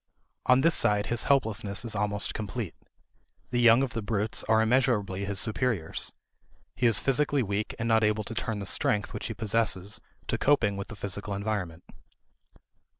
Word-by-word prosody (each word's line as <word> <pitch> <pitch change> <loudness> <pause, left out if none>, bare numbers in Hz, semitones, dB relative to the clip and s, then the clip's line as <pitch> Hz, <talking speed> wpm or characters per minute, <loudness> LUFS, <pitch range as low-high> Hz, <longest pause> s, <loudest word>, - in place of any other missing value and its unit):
On 125 +1 +5
this 165 +3 +4
side 105 -3 +2
his 120 - -1
helplessness 110 -6 0
is 115 - +1
almost 105 0 0
complete. 105 -3 -5 0.8
The 120 -1 +1
young 120 +2 +6
of 130 - -3
the 115 - -3
brutes 105 0 -1
are 110 0 +3
immeasurably 110 -5 +1
his 100 -1 0
superiors. 110 -6 -1 0.6
He 120 - +2
is 115 - +4
physically 140 0 +1
weak 100 +1 -3
and 115 - -3
not 110 -1 +3
able 105 0 +1
to 110 - -7
turn 115 -1 -3
the 100 - -5
strength 105 +1 0
which - - -5
he 110 - -5
possesses 105 -2 -1 0.2
to - - -2
coping 115 -8 +2
with 100 0 -5
the 110 - -9
physical 100 +1 -3
environment. 100 -5 -3
110 Hz, 170 wpm, -28 LUFS, 100-120 Hz, 0.8 s, young